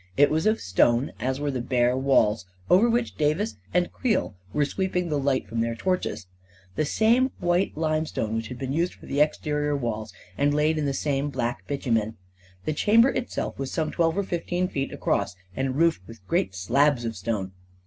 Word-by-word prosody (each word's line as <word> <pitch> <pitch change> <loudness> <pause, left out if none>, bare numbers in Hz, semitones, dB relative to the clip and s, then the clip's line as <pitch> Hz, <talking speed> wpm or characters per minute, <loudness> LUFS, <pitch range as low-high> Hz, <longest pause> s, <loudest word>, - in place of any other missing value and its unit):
It 145 +1 +5
was 160 +6 +1
of 215 +1 +2
stone, 120 +7 +2
as 130 +1 -1
were 145 0 -1
the 130 -2 -2
bare 125 0 +2
walls 115 -7 +2 0.2
over 210 +7 +6
which 235 0 0
Davis 155 +9 0
and 180 0 +1
Creel 235 -7 0 0.2
were 150 -1 +2
sweeping 180 +1 -1
the 150 -2 0
light 135 -1 0
from 115 - -3
their 115 0 -1
torches 180 - -2 0.2
— 90 +1 -29
the 155 - +1
same 235 - +3
white 175 -1 0
limestone 155 -8 -1
which 115 0 -2
had 125 - -7
been 130 +1 -3
used 170 +4 0
for - - -15
the 140 - 0
exterior 150 -1 +1
walls, 110 -4 -3 0.3
and 145 +1 +3
laid 155 +1 +2
in 150 - 0
the 140 - 0
same 145 0 -1
black 120 -3 -3
bitumen. 115 -6 -1 0.5
The 155 - 0
chamber 230 - +5
itself 255 - -3
was 135 -1 -3
some 155 -1 -1
twelve 165 0 +1
or 200 - +1
fifteen 175 0 -1
feet 135 -6 -3
across, - - -1 0.2
and 130 -1 -1
roofed 165 - +2
with 115 -4 -13
great 95 -1 0
slabs 125 +7 +2
of 115 -1 -3
stone. 95 -1 -3
145 Hz, 195 wpm, -25 LUFS, 120-170 Hz, 0.5 s, over